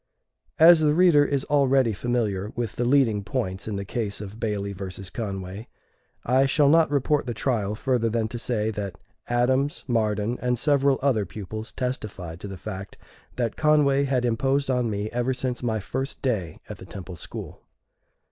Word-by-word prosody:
As 165 +1 +8
the 150 -1 +3
reader 170 -4 +6
is 140 -2 0
already 135 -5 +3
familiar 105 -3 -1
with 120 -4 -3
the 120 - -1
leading 120 -6 +3
points 95 -4 -3
in 105 - -3
the 100 0 -4
case 105 -1 -3
of 105 +1 -8
Bailey 105 -3 -2
versus 95 -1 -7
Conway, 100 -1 -5 0.6
I 130 +3 +4
shall 145 +1 +4
not 160 0 +5
report 145 0 +1
the 120 - -3
trial 105 -5 -1
further 125 -1 0
than 110 0 0
to 120 - -5
say 110 -2 -1
that 100 -4 -5 0.3
Adams, 130 +4 +1
Marden, 110 -1 0
and 125 -1 +1
several 140 0 +3
other 110 -8 +2
pupils 110 +3 -7
testified 100 -10 -4
to 100 - -7
the 95 -1 -7
fact 95 +2 -7 0.4
that 120 -3 -1
Conway 145 -2 +3
had 130 -2 +1
imposed 135 +4 +1
on 125 -2 +1
me 105 0 -3
ever 125 +2 0
since 130 -1 -3
my 110 -3 -1
first 135 +7 -4
day 105 - -1
at - - -7
the - - -11
Temple 95 -2 -8
School. 80 - -8
120 Hz, 175 wpm, -25 LUFS, 105-135 Hz, 0.6 s, As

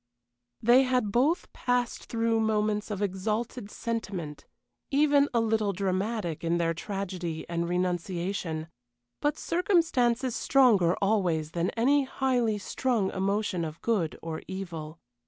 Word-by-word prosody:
They 240 +3 +7
had 255 -5 +1
both 275 - +1
passed 245 -1 -1
through 230 -1 0
moments 215 -1 0
of 205 -1 -2
exalted 210 +3 -2
sentiment, 195 -11 -5 0.4
even 285 0 +4
a 235 - +2
little 220 -2 +1
dramatic 190 -2 -2
in 170 +1 +1
their 165 -1 +1
tragedy 180 -3 -4
and 170 0 -2
renunciation, 175 -2 -2 0.5
but 295 +1 +1
circumstance 330 - +2
is 255 -3 -1
stronger 215 -11 +4
always 175 -7 +1
than 170 +1 0
any 275 +4 +3
highly 250 -5 0
strung 220 0 -1
emotion 195 -2 -1
of 155 0 -5
good 200 -9 0
or 160 -1 -4
evil. 170 -4 -6
205 Hz, 125 wpm, -28 LUFS, 175-240 Hz, 0.5 s, They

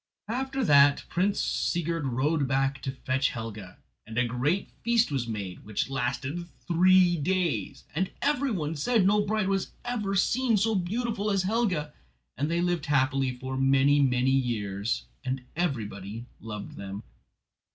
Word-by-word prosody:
After 265 +3 -1
that 140 -6 +5
Prince 195 +3 +1
Sigurd 165 -3 -1
rode 140 +4 +1
back 135 +1 0
to 135 - -3
fetch 130 +1 0
Helga, 110 -5 -7 0.3
and 110 +1 -7
a 125 - +3
great 135 +11 -1
feast 235 -5 +2
was 130 -4 -1
made 100 -5 -5
which 105 +5 -2
lasted 135 +6 -2 0.2
three 180 0 +5
days; 165 - -1
and 180 +5 0
every 280 -1 +1
one 165 -8 -2
said 210 +7 +2
no 210 +2 +4
bride 210 -1 0
was 195 -1 -1
ever 210 -5 -1
seen 235 +3 +2
so 220 +3 +2
beautiful 210 +3 -1
as 195 -2 +1
Helga, 185 -8 0 0.4
and 145 +2 -1
they 170 +1 +1
lived 175 -3 0
happily 135 -2 +1
for 130 +1 -5
many, 135 +2 +4
many 130 -1 +2
years, 105 - -1 0.2
and 130 0 -3
everybody 115 - -3
loved 105 -2 -7
them. 100 +1 -6
145 Hz, 150 wpm, -28 LUFS, 125-190 Hz, 0.4 s, that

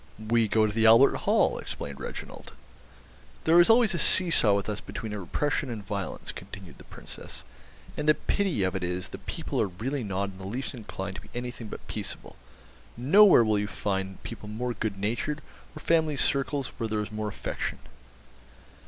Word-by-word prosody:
"We 110 +1 +1
go 110 +1 +3
to 105 - 0
the 115 0 +4
Albert 115 +5 +7
Hall," - - +2
explained 70 -1 -6
Reginald. - - -8 0.9
"There 165 +2 +6
is 175 - +6
always 225 -3 +5
a 170 - -1
see 185 -2 +5
saw 105 -9 +5
with 100 - -2
us 105 -1 -3
between 110 -3 -6
repression 135 - -1
and 110 -4 -6
violence," 100 -1 -4
continued 95 -4 -11
the - - -13
Princess; - - -7 0.5
"and 150 +1 0
the 155 - +6
pity 190 - 0
of 95 +1 0
it 95 - -2
is 90 +1 -3
the - - -8
people - - -3
are - - +2
really 125 +9 -3
not 100 -1 -2
in 95 - -14
the 95 - -7
least 125 +7 -3
inclined 100 -5 -6
to - - -8
be - - -17
anything 120 -2 -5
but - - -9
peaceable. - - -5 0.6
Nowhere 160 - +7
will 110 -2 +2
you 105 - -1
find 95 -2 -3
people 110 -3 -8
more 120 +3 -3
good 110 -2 -3
natured, 120 +9 -2 0.4
or - - -7
family 160 -2 +2
circles 140 0 0
where 115 - -1
there 105 0 0
is 105 - -6
more 110 0 -3
affection." 105 - -4
110 Hz, 190 wpm, -28 LUFS, 100-135 Hz, 0.9 s, Albert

